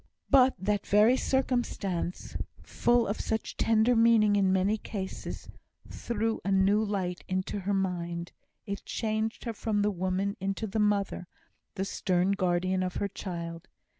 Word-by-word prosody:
But 265 Hz, -2 st, +6 dB
that 200 Hz, +2 st, -1 dB
very 210 Hz, +5 st, +5 dB
circumstance, 240 Hz, -10 st, -1 dB, 0.3 s
full 240 Hz, -1 st, +2 dB
of 205 Hz, -, -2 dB
such 220 Hz, 0 st, -3 dB
tender 225 Hz, +2 st, +3 dB
meaning 225 Hz, -2 st, +5 dB
in 195 Hz, -2 st, +3 dB
many 190 Hz, +3 st, +2 dB
cases, 195 Hz, -3 st, -6 dB, 0.4 s
threw 225 Hz, -1 st, -2 dB
a 195 Hz, -, -1 dB
new 195 Hz, +2 st, +4 dB
light 190 Hz, -4 st, -2 dB
into 185 Hz, +2 st, -2 dB
her 200 Hz, +1 st, -1 dB
mind. 175 Hz, -2 st, -2 dB, 0.3 s
It 200 Hz, 0 st, -5 dB
changed 220 Hz, 0 st, -2 dB
her 230 Hz, -, -2 dB
from 210 Hz, -1 st, -1 dB
the 210 Hz, -, +2 dB
woman 185 Hz, +2 st, -1 dB
into 195 Hz, +3 st, -2 dB
the 215 Hz, +1 st, -2 dB
mother 200 Hz, -3 st, 0 dB, 0.5 s
the 190 Hz, -, -2 dB
stern 185 Hz, -1 st, +1 dB
guardian 185 Hz, -1 st, +1 dB
of 185 Hz, -1 st, -2 dB
her 200 Hz, -, -1 dB
child. 170 Hz, -4 st, -6 dB
200 Hz, 145 wpm, -29 LUFS, 185-220 Hz, 0.5 s, But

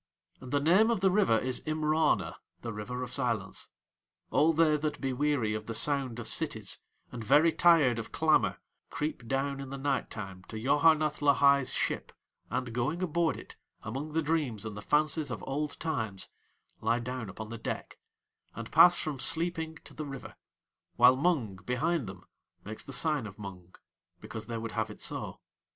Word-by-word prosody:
And 130 Hz, -1 st, -10 dB
the 145 Hz, -, +2 dB
name 185 Hz, +10 st, +4 dB
of 230 Hz, -5 st, 0 dB
the 190 Hz, -1 st, +4 dB
River 190 Hz, -, +4 dB
is 125 Hz, +2 st, -1 dB
Imrana 155 Hz, 0 st, +1 dB, 0.3 s
the 115 Hz, -2 st, -5 dB
River 125 Hz, +4 st, -5 dB
of 125 Hz, -, -6 dB
Silence. 115 Hz, -8 st, -1 dB, 0.6 s
All 155 Hz, +3 st, +4 dB
they 160 Hz, -1 st, +4 dB
that 150 Hz, 0 st, -3 dB
be 135 Hz, -2 st, -1 dB
weary 135 Hz, -5 st, +1 dB
of 110 Hz, 0 st, -5 dB
the 115 Hz, -, -3 dB
sound 135 Hz, -3 st, +1 dB
of 120 Hz, -, -6 dB
cities -, -, -1 dB, 0.3 s
and 120 Hz, -2 st, -6 dB
very 150 Hz, +9 st, +5 dB
tired 155 Hz, -9 st, +4 dB
of 115 Hz, -, -7 dB
clamour -, -, +2 dB, 0.3 s
creep 150 Hz, -6 st, -4 dB
down 135 Hz, +2 st, -1 dB
in 135 Hz, -1 st, -6 dB
the 140 Hz, -, -5 dB
night 135 Hz, 0 st, -1 dB
time 95 Hz, -4 st, -7 dB
to 110 Hz, -, -7 dB
Yoharneth 150 Hz, +5 st, +3 dB
Lahai's 140 Hz, -2 st, +4 dB
ship, -, -, -1 dB, 0.4 s
and 120 Hz, -2 st, -3 dB
going 145 Hz, +10 st, -1 dB
aboard 170 Hz, -1 st, +1 dB
it, -, -, -11 dB, 0.3 s
among 135 Hz, +8 st, -5 dB
the 160 Hz, 0 st, +1 dB
dreams 145 Hz, -9 st, -1 dB
and 110 Hz, -2 st, -5 dB
the 105 Hz, -, -7 dB
fancies 150 Hz, +3 st, +2 dB
of 125 Hz, -, -5 dB
old 145 Hz, +2 st, -3 dB
times, 110 Hz, -, -3 dB, 0.5 s
lie 120 Hz, -, +1 dB
down 125 Hz, -2 st, -5 dB
upon 110 Hz, +3 st, -8 dB
the 115 Hz, 0 st, -7 dB
deck, -, -, -5 dB, 0.6 s
and 115 Hz, 0 st, -7 dB
pass 175 Hz, +3 st, +7 dB
from 150 Hz, -4 st, -3 dB
sleeping 165 Hz, +1 st, 0 dB
to -, -, -13 dB
the 155 Hz, -1 st, -6 dB
River, 135 Hz, -2 st, -8 dB, 0.6 s
while 125 Hz, +2 st, +7 dB
Mung, 135 Hz, -, 0 dB
behind 125 Hz, -, -1 dB
them, 95 Hz, -2 st, -10 dB, 0.4 s
makes 110 Hz, +2 st, -6 dB
the -, -, -9 dB
sign 145 Hz, -3 st, 0 dB
of 100 Hz, 0 st, -12 dB
Mung 95 Hz, -4 st, -10 dB, 0.4 s
because 110 Hz, -, -7 dB
they 115 Hz, -1 st, -3 dB
would 115 Hz, 0 st, -5 dB
have -, -, -1 dB
it -, -, -10 dB
so. -, -, -3 dB
135 Hz, 180 wpm, -30 LUFS, 115-155 Hz, 0.6 s, pass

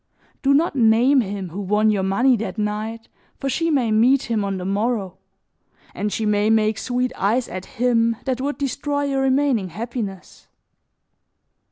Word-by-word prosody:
Do 275 Hz, 0 st, +3 dB
not 315 Hz, 0 st, +1 dB
name 245 Hz, +3 st, +4 dB
him 195 Hz, -3 st, -5 dB
who 185 Hz, +5 st, -6 dB
won 210 Hz, +2 st, +2 dB
your 200 Hz, -2 st, 0 dB
money 240 Hz, +7 st, +3 dB
that 225 Hz, +1 st, -5 dB
night 215 Hz, +2 st, -3 dB, 0.3 s
for 275 Hz, -, -2 dB
she 330 Hz, +4 st, 0 dB
may 260 Hz, -8 st, +1 dB
meet 240 Hz, +4 st, +3 dB
him 215 Hz, -2 st, +1 dB
on 195 Hz, -1 st, -2 dB
the 180 Hz, -, -5 dB
morrow, 200 Hz, -1 st, -2 dB, 0.7 s
and 210 Hz, 0 st, -3 dB
she 220 Hz, -, -2 dB
may 210 Hz, 0 st, +2 dB
make 215 Hz, -2 st, +2 dB
sweet 250 Hz, 0 st, -1 dB
eyes 230 Hz, +5 st, 0 dB
at 185 Hz, 0 st, -7 dB
him 230 Hz, -1 st, +2 dB
that 260 Hz, -1 st, -1 dB
would 285 Hz, +2 st, -2 dB
destroy 285 Hz, +1 st, -2 dB
your 275 Hz, -1 st, 0 dB
remaining 265 Hz, -7 st, +1 dB
happiness. 210 Hz, -1 st, -6 dB
225 Hz, 165 wpm, -21 LUFS, 205-260 Hz, 0.7 s, name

